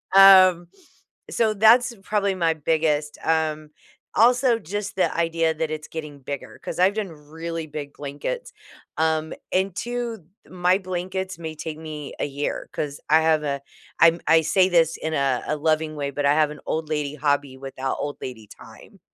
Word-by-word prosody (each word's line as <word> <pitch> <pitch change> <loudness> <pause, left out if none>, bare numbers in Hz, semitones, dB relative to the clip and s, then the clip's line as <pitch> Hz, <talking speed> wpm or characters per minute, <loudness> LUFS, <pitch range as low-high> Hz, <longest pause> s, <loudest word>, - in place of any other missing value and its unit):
Um, 185 -3 +8 0.6
so, 220 -2 +2
that's 235 +4 +5
probably 200 -2 0
my 165 -3 +2
biggest, 155 -1 0
um 155 -1 0 0.4
also, 245 +1 +4
just 205 +2 -5
the 185 - +1
idea 165 -1 +1
that 155 0 -2
it's 155 -1 -5
getting 150 -3 -7
bigger, 140 +1 -7
'cause - - -5
I've 185 +2 +4
done 215 -2 -2
really 160 +2 -6
big 145 -1 -7
blankets, 145 - -5 0.4
um, 160 0 0 0.2
and 190 0 0
too 240 -1 -3 0.3
my 180 0 +2
blankets 185 0 -4
may 160 -1 -6
take 155 0 -6
me 155 -3 -7
a - - 0
year, 145 0 -4
'cause 145 -1 -4
I 160 +1 +6
have 160 -1 +3
a 140 -1 -2 0.4
I'm 165 +1 +6
I 160 0 +6
say 185 +4 +3
this 165 -2 +3
in 160 - -4
a 135 -3 0
a 150 - 0
loving 155 0 0
way, 140 -1 -3
but 145 +1 -2
I 145 - +5
have 155 -1 +3
an 150 - -9
old 160 -1 -2
lady 150 -2 -2
hobby 145 -2 0
without 135 0 -4
old 145 0 -4
lady 120 -4 -7
time. - - -15
160 Hz, 170 wpm, -23 LUFS, 150-185 Hz, 0.6 s, Um